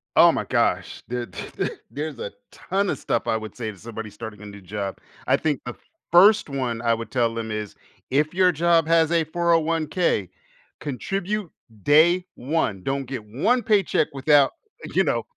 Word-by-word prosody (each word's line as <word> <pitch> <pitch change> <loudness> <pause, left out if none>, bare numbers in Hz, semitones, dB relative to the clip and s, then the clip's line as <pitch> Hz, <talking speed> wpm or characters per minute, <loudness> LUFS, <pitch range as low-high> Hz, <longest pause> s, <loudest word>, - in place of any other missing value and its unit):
Oh - - +8
my - - -2
gosh. - - 0
There 120 0 -3
th - - -9
th - - -1 0.2
there's 145 -3 -5
a - - -5 0.2
ton 195 +1 -1
of 145 - -1
stuff 115 - -1
I 110 - +2
would 110 -1 -8
say 115 -3 -4
to 100 - -15
somebody 110 +1 -7
starting 105 0 -9
a - - -9
new 100 -1 -10
job. 100 +1 -5 0.3
I - - +4
think 150 -4 -1
the 120 - -5 0.4
1st 195 0 +6
one 125 -4 -2
I 115 -1 +2
would 115 0 -5
tell 115 -3 +1
them 115 -1 -4
is, 105 -1 -4 0.3
"If 150 +4 +1
your 185 0 +4
job 165 0 +3
has 165 -1 +3
a 170 -1 +3
401k, 165 - +1 0.5
contribute 195 +7 -3 0.3
day 170 +5 +5
1. 120 - -1
Don't 135 0 -2
get 125 -3 -6
1 200 - +1
paycheck 200 -8 +2
without, 140 0 +4 0.4
you - - +3
know - - 0
140 Hz, 180 wpm, -24 LUFS, 115-170 Hz, 0.5 s, Oh